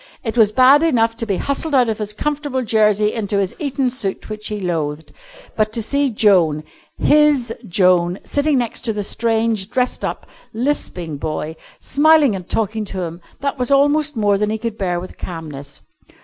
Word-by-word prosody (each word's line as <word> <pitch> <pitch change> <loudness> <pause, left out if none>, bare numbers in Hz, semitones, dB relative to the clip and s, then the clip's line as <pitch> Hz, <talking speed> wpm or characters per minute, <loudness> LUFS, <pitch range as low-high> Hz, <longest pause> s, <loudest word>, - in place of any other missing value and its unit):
It 225 -3 -3
was 220 -3 +4
bad 260 +5 +6
enough 230 -8 +2
to 230 - -3
be 195 -3 0
hustled 280 +2 -2
out 250 -2 +4
of 220 -1 -2
his 210 -1 -3
comfortable 285 +2 -2
jersey 210 -1 +2
into 205 -2 -2
his 195 -2 0
Eton 275 -3 -1
suit 215 -4 -3
which 215 0 -5
he 210 -1 -3
loathed. 160 -4 -3 0.4
But 215 -1 +1
to 230 - -1
see 280 +4 +1
Joan, 180 -9 +3 0.3
his 290 -6 +3
Joan, 180 -1 +3
sitting 285 0 0
next 240 -1 -2
the 210 -1 -3
strange, 225 -2 0
dressed 250 0 -1
up, - - -4 0.3
lisping 190 - -2
boy, 155 +1 -4 0.3
smiling 295 -5 +4
and 185 -2 -8
talking 220 0 -1
to 190 -2 -5
him, 170 +1 -7 0.2
that 280 0 -2
was 250 - 0
almost 290 0 +3
more 205 -2 +2
than 210 0 0
he 220 - -1
could 225 0 -4
bear 180 -3 -1
with 185 - -10
calmness. 150 -5 -8
220 Hz, 175 wpm, -19 LUFS, 190-260 Hz, 0.4 s, bad